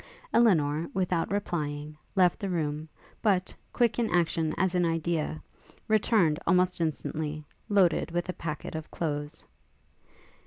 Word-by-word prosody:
Elinor, 165 Hz, -8 st, +3 dB
without 180 Hz, -3 st, 0 dB
replying, 150 Hz, -6 st, -2 dB, 0.2 s
left 180 Hz, 0 st, +4 dB
the 200 Hz, -3 st, -3 dB
room; 155 Hz, -3 st, -2 dB, 0.3 s
but, 190 Hz, -4 st, +1 dB, 0.2 s
quick 235 Hz, -2 st, +2 dB
in 230 Hz, -, +1 dB
action 165 Hz, -2 st, +1 dB
as 190 Hz, 0 st, +1 dB
in 180 Hz, -1 st, +2 dB
idea, 165 Hz, -2 st, -1 dB, 0.5 s
returned, 210 Hz, -7 st, +3 dB
almost 180 Hz, -1 st, +3 dB
instantly, 155 Hz, -1 st, -2 dB, 0.2 s
loaded 190 Hz, -4 st, +3 dB
with 175 Hz, +1 st, -2 dB
a 180 Hz, -, -2 dB
packet 160 Hz, -3 st, -5 dB
of 160 Hz, 0 st, -5 dB
clothes. 150 Hz, -1 st, -3 dB
170 Hz, 125 wpm, -28 LUFS, 155-185 Hz, 0.5 s, left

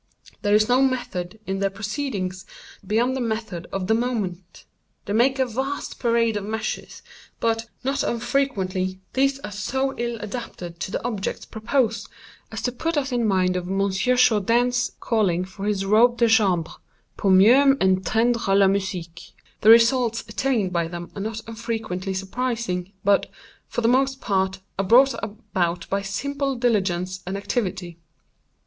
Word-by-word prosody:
There 205 Hz, 0 st, +3 dB
is 215 Hz, 0 st, +4 dB
no 250 Hz, +2 st, +4 dB
method 220 Hz, -7 st, -1 dB
in 190 Hz, 0 st, -2 dB
their 195 Hz, 0 st, +1 dB
proceedings, 200 Hz, -3 st, -4 dB, 0.4 s
beyond 230 Hz, +6 st, +1 dB
the 265 Hz, -, -2 dB
method 220 Hz, -7 st, -3 dB
of 195 Hz, -1 st, -2 dB
the 220 Hz, -, +2 dB
moment. 200 Hz, -7 st, -3 dB, 0.4 s
They 200 Hz, -, -3 dB
make 260 Hz, +5 st, +3 dB
a 260 Hz, -, +2 dB
vast 265 Hz, +4 st, -4 dB
parade 230 Hz, -2 st, +2 dB
of 205 Hz, -, -4 dB
measures; 220 Hz, +2 st, -4 dB, 0.4 s
but, 225 Hz, 0 st, 0 dB, 0.2 s
not 275 Hz, +2 st, 0 dB
unfrequently, 195 Hz, -7 st, -1 dB
these 275 Hz, +1 st, +2 dB
are -, -, -7 dB
so 265 Hz, +6 st, -1 dB
ill 235 Hz, 0 st, -2 dB
adapted 200 Hz, -6 st, -7 dB
to -, -, -3 dB
the -, -, -3 dB
objects 215 Hz, -5 st, -3 dB
proposed, 225 Hz, +1 st, -1 dB, 0.4 s
as -, -, -5 dB
to 250 Hz, -, 0 dB
put 320 Hz, +6 st, -2 dB
us 275 Hz, -2 st, -1 dB
in 240 Hz, -2 st, +1 dB
mind 185 Hz, -2 st, +2 dB
of 180 Hz, -1 st, -3 dB
Monsieur 195 Hz, +5 st, +1 dB
Jourdain's 245 Hz, +1 st, +2 dB
calling 190 Hz, -6 st, +1 dB
for 195 Hz, +2 st, -8 dB
his 200 Hz, -2 st, 0 dB
robe 235 Hz, +4 st, +4 dB
de 235 Hz, -, +4 dB
chambre—pour 195 Hz, -2 st, 0 dB
mieux 250 Hz, +9 st, +6 dB
entendre 195 Hz, +3 st, +2 dB
la 200 Hz, 0 st, +6 dB
musique. 185 Hz, -3 st, -3 dB, 0.3 s
The 215 Hz, -, +5 dB
results 230 Hz, 0 st, +5 dB
attained 220 Hz, -4 st, 0 dB
by 170 Hz, -1 st, 0 dB
them 170 Hz, 0 st, -7 dB
are 200 Hz, -, -6 dB
not 220 Hz, +2 st, -4 dB
unfrequently 220 Hz, -5 st, -4 dB
surprising, 195 Hz, -2 st, -3 dB
but, 200 Hz, 0 st, +3 dB, 0.4 s
for -, -, -3 dB
the 230 Hz, -, +2 dB
most 265 Hz, +2 st, +2 dB
part, 190 Hz, -3 st, -1 dB, 0.2 s
are 195 Hz, -, +1 dB
brought 260 Hz, +7 st, +6 dB
about 180 Hz, -5 st, -2 dB
by 195 Hz, +1 st, +1 dB
simple 275 Hz, +8 st, -2 dB
diligence 185 Hz, -6 st, 0 dB
and 190 Hz, +1 st, -2 dB
activity. 185 Hz, -5 st, -3 dB
215 Hz, 155 wpm, -23 LUFS, 190-245 Hz, 0.4 s, mieux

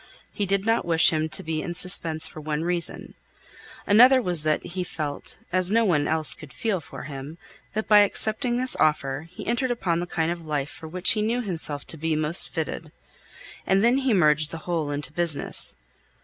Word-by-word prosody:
He 205 Hz, -, -2 dB
did 195 Hz, +1 st, -1 dB
not 225 Hz, +1 st, +1 dB
wish 165 Hz, -1 st, +3 dB
him 155 Hz, 0 st, -1 dB
to -, -, +1 dB
be 160 Hz, -1 st, -3 dB
in 175 Hz, +1 st, -6 dB
suspense 170 Hz, -3 st, +4 dB
for 155 Hz, -, -11 dB
one 150 Hz, +1 st, -3 dB
reason. 175 Hz, 0 st, -2 dB, 0.7 s
Another 250 Hz, +6 st, +6 dB
was 180 Hz, -9 st, +4 dB
that 155 Hz, 0 st, -1 dB
he 180 Hz, +1 st, -5 dB
felt, 150 Hz, -4 st, -6 dB, 0.2 s
as 185 Hz, -1 st, +2 dB
no 225 Hz, +2 st, +2 dB
one 150 Hz, -7 st, +1 dB
else 160 Hz, -1 st, -1 dB
could 150 Hz, -, -14 dB
feel 205 Hz, -6 st, -2 dB
for -, -, -10 dB
him, 140 Hz, +3 st, -9 dB, 0.4 s
that 220 Hz, +1 st, -3 dB
by 210 Hz, -1 st, +6 dB
accepting 220 Hz, +4 st, +1 dB
this 255 Hz, +1 st, +1 dB
offer, 150 Hz, -1 st, -1 dB
he 180 Hz, -, -10 dB
entered 240 Hz, +3 st, -1 dB
upon 185 Hz, -8 st, -1 dB
the 175 Hz, -, -4 dB
kind 165 Hz, -1 st, -2 dB
of 175 Hz, 0 st, -6 dB
life 145 Hz, -2 st, -3 dB
for 160 Hz, +1 st, -11 dB
which 180 Hz, +3 st, +1 dB
he 215 Hz, -, 0 dB
knew 235 Hz, +3 st, -1 dB
himself 160 Hz, -7 st, +2 dB
to 160 Hz, -, -2 dB
be 160 Hz, +1 st, -2 dB
most 155 Hz, +3 st, +4 dB
fitted. 160 Hz, -1 st, -5 dB, 0.8 s
And 195 Hz, +2 st, +2 dB
then 240 Hz, +3 st, +3 dB
he 270 Hz, -2 st, 0 dB
merged 155 Hz, -6 st, +3 dB
the 165 Hz, -, -6 dB
whole 165 Hz, -4 st, -2 dB
into 145 Hz, +1 st, -3 dB
business. 165 Hz, -4 st, 0 dB
170 Hz, 200 wpm, -24 LUFS, 155-205 Hz, 0.8 s, Another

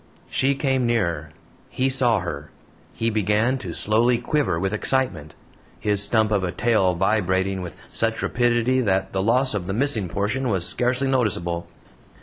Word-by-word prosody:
She 140 Hz, +1 st, +2 dB
came 135 Hz, -3 st, 0 dB
nearer; 85 Hz, -10 st, -1 dB, 0.4 s
he 130 Hz, -, 0 dB
saw 125 Hz, -6 st, +3 dB
her; 75 Hz, -4 st, -6 dB, 0.4 s
he 115 Hz, 0 st, -1 dB
began 110 Hz, +5 st, +1 dB
to 90 Hz, -, -6 dB
slowly 115 Hz, +7 st, +2 dB
quiver 125 Hz, -, 0 dB
with 95 Hz, +2 st, -1 dB
excitement 105 Hz, -, -1 dB, 0.4 s
his 105 Hz, -1 st, 0 dB
stump 110 Hz, +1 st, +2 dB
of 100 Hz, -3 st, +1 dB
a 90 Hz, -, -1 dB
tail 95 Hz, -3 st, +1 dB
vibrating 95 Hz, 0 st, 0 dB
with 90 Hz, -2 st, -7 dB, 0.2 s
such -, -, -1 dB
rapidity 120 Hz, +1 st, +1 dB
that 95 Hz, -5 st, 0 dB
the 95 Hz, -, 0 dB
loss 125 Hz, +5 st, +2 dB
of 95 Hz, -4 st, -3 dB
the 95 Hz, -, -2 dB
missing 115 Hz, -7 st, +1 dB
portion 120 Hz, +8 st, -1 dB
was 95 Hz, -5 st, 0 dB
scarcely 125 Hz, +9 st, -1 dB
noticeable. 85 Hz, -10 st, 0 dB
110 Hz, 155 wpm, -23 LUFS, 95-125 Hz, 0.4 s, saw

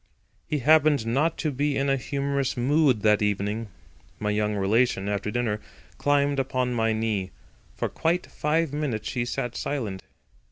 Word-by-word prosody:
He 150 Hz, -, 0 dB
happened 150 Hz, -2 st, +4 dB
not 145 Hz, +8 st, +1 dB
to 155 Hz, -, -1 dB
be 145 Hz, +1 st, 0 dB
in 140 Hz, -, +1 dB
a 135 Hz, -, +3 dB
humorous 140 Hz, 0 st, -2 dB
mood 130 Hz, -2 st, +3 dB
that 105 Hz, 0 st, +4 dB
evening. 105 Hz, +2 st, -1 dB, 0.5 s
My 105 Hz, 0 st, -1 dB
young 105 Hz, 0 st, 0 dB
relation, 100 Hz, +1 st, +1 dB
after 100 Hz, 0 st, -1 dB
dinner, 105 Hz, -2 st, -1 dB, 0.4 s
climbed 145 Hz, -1 st, +2 dB
upon 130 Hz, -1 st, 0 dB
my 115 Hz, -1 st, +1 dB
knee. 110 Hz, -4 st, -1 dB, 0.5 s
For -, -, -1 dB
quite 170 Hz, +2 st, 0 dB
five 155 Hz, 0 st, -1 dB
minutes 135 Hz, -8 st, -2 dB
she 120 Hz, -1 st, -1 dB
sat 120 Hz, 0 st, -3 dB
silent. 110 Hz, -10 st, -3 dB
125 Hz, 155 wpm, -26 LUFS, 105-145 Hz, 0.5 s, happened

